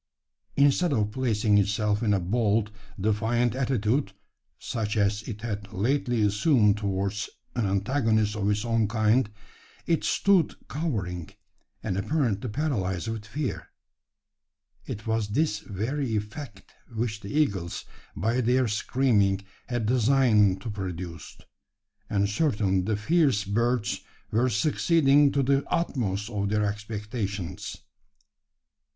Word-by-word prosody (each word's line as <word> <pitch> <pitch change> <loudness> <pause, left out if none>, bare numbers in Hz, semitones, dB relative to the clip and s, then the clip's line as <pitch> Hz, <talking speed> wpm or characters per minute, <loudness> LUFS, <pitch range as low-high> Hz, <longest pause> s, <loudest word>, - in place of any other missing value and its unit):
Instead 145 +4 +3
of 105 -4 +1
placing 110 -4 +2
itself 105 +1 +1
in 110 -3 +1
a 100 - +3
bold, 105 +2 +1 0.3
defiant 110 +4 +1
attitude 125 -3 0 0.4
such 110 -1 -3
as 105 0 +2
it 105 -2 -6
had 105 -3 -5
lately 120 +2 0
assumed 105 +1 +3
towards 100 -1 -2 0.3
an 115 -4 +1
antagonist 110 +1 +1
of 105 -1 0
its 105 +2 0
own 115 -2 +2
kind 110 +2 +2 0.6
it 165 -2 +1
stood 195 -6 +3
cowering, 100 - -3 0.5
and 90 - -2
apparently 120 -3 0
paralysed 105 - -1
with 110 -2 -5
fear. 140 +4 -4 1.2
It 105 - -6
was 110 -2 0
this 105 0 0
very 115 +6 -3
effect 105 +1 -6 0.2
which 110 -1 -2
the 100 -2 -9
eagles, 100 - 0 0.3
by 115 +8 0
their 125 +1 +2
screaming, 105 -3 +2 0.3
had 120 -3 -2
designed 110 -5 +3
to 115 - -4
produce; 90 -4 -6 0.7
and 100 -1 +1
certainly 100 - +1
the 105 +3 -1
fierce 135 -2 +2
birds 115 +3 0 0.3
were 120 +4 +2
succeeding 145 - +3
to 140 - +2
the 135 +1 +2
utmost 105 - -1
of 100 -2 -1
their 105 0 +1
expectations. 105 -3 -4
110 Hz, 120 wpm, -27 LUFS, 100-125 Hz, 1.2 s, Instead